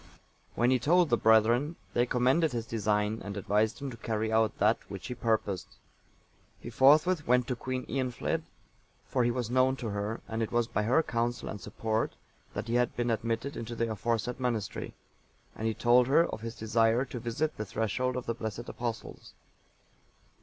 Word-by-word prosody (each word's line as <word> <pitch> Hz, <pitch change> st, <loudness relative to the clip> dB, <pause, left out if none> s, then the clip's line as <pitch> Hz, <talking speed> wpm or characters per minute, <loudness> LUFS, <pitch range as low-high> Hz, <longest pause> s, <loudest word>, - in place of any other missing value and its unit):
When 120 Hz, +2 st, +3 dB
he 130 Hz, -, +3 dB
told 170 Hz, +4 st, +3 dB
the -, -, +6 dB
brethren, 115 Hz, +8 st, +4 dB, 0.2 s
they 120 Hz, +1 st, +2 dB
commended 130 Hz, +5 st, +2 dB
his 115 Hz, -2 st, -2 dB
design, 105 Hz, -1 st, 0 dB
and 100 Hz, 0 st, -6 dB
advised 105 Hz, +3 st, +1 dB
him 140 Hz, -1 st, -4 dB
to 115 Hz, -, -9 dB
carry 110 Hz, -1 st, -2 dB
out 110 Hz, -1 st, +2 dB
that 105 Hz, +3 st, +3 dB
which 95 Hz, -3 st, -7 dB
he -, -, -4 dB
purposed. 100 Hz, -4 st, -2 dB, 0.8 s
He 120 Hz, -, -8 dB
forthwith 150 Hz, +7 st, +4 dB
went 125 Hz, 0 st, +4 dB
to 125 Hz, -, -1 dB
Queen 130 Hz, +1 st, -4 dB
Eanfled, 130 Hz, -3 st, -2 dB, 0.6 s
for 125 Hz, -, 0 dB
he 120 Hz, -, +2 dB
was 120 Hz, -1 st, -2 dB
known 130 Hz, +1 st, +3 dB
to 120 Hz, -4 st, -5 dB
her, 105 Hz, +2 st, -3 dB
and 115 Hz, 0 st, -3 dB
it 110 Hz, -, -2 dB
was 120 Hz, 0 st, +2 dB
by 110 Hz, -2 st, -1 dB
her 125 Hz, +9 st, +3 dB
counsel 120 Hz, -1 st, -2 dB
and 105 Hz, -, -6 dB
support 110 Hz, 0 st, -2 dB, 0.4 s
that -, -, -4 dB
he 115 Hz, -, -2 dB
had 120 Hz, 0 st, +1 dB
been 120 Hz, -1 st, 0 dB
admitted 115 Hz, +4 st, -2 dB
into 115 Hz, +1 st, -5 dB
the 115 Hz, 0 st, -1 dB
aforesaid 115 Hz, +3 st, -2 dB
monastery, 115 Hz, -5 st, -3 dB, 0.6 s
and 110 Hz, -, -2 dB
he 110 Hz, -, -1 dB
told 120 Hz, +1 st, +4 dB
her 155 Hz, +5 st, +5 dB
of 110 Hz, -, -6 dB
his 115 Hz, 0 st, -6 dB
desire 115 Hz, +3 st, +2 dB
to 125 Hz, -2 st, -6 dB
visit 120 Hz, +7 st, -2 dB
the 105 Hz, -, -3 dB
threshold 115 Hz, +5 st, -1 dB
of 125 Hz, -, -4 dB
the 115 Hz, -, -1 dB
blessed 115 Hz, 0 st, -5 dB
Apostles. 120 Hz, -2 st, -6 dB
115 Hz, 185 wpm, -30 LUFS, 110-125 Hz, 0.8 s, the